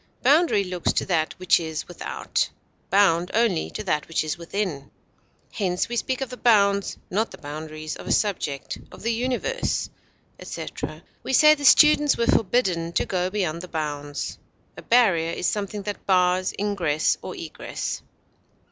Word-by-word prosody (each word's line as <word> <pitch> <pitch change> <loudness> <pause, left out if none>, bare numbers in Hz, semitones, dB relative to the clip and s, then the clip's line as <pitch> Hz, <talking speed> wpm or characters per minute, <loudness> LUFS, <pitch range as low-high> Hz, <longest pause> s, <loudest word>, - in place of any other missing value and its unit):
Boundary 285 - +4
looks 180 -2 -1
to - - 0
that 160 -4 0
which 185 -1 +3
is 160 -2 -5
without; 175 - -2 0.4
bound 180 -3 +3
only 225 -7 +2
to 215 - -6
that 155 -7 -1
which 165 - 0
is 155 -1 -2
within. 170 -5 -4 0.6
Hence 180 -4 -1
we 240 - -3
speak 260 +2 -1
of 265 -2 -3
the 250 - -7
bounds, 200 -4 +3
not 215 +4 0
the - - -11
boundaries, 155 +1 -6
of - - -10
a - - -1
subject, 160 -10 -1
of - - -12
the 230 +1 +1
universe, 255 - -1 0.5
etc.; - - -6 0.2
we - - -4
say 305 +3 +7
the 290 -1 -4
students 295 -1 +6
were 235 - +1
forbidden 185 -8 +1
to - - +1
go 180 -1 -1
beyond 175 -5 -2
the 180 - -8
bounds. 145 -3 -4 0.4
A - - -9
barrier 185 -9 +3
is - - -3
something 205 +1 -2
that 205 0 -6
bars 185 -1 +3
ingress 180 -7 0
or - - -7
egress. - - -5
185 Hz, 160 wpm, -24 LUFS, 165-230 Hz, 0.6 s, say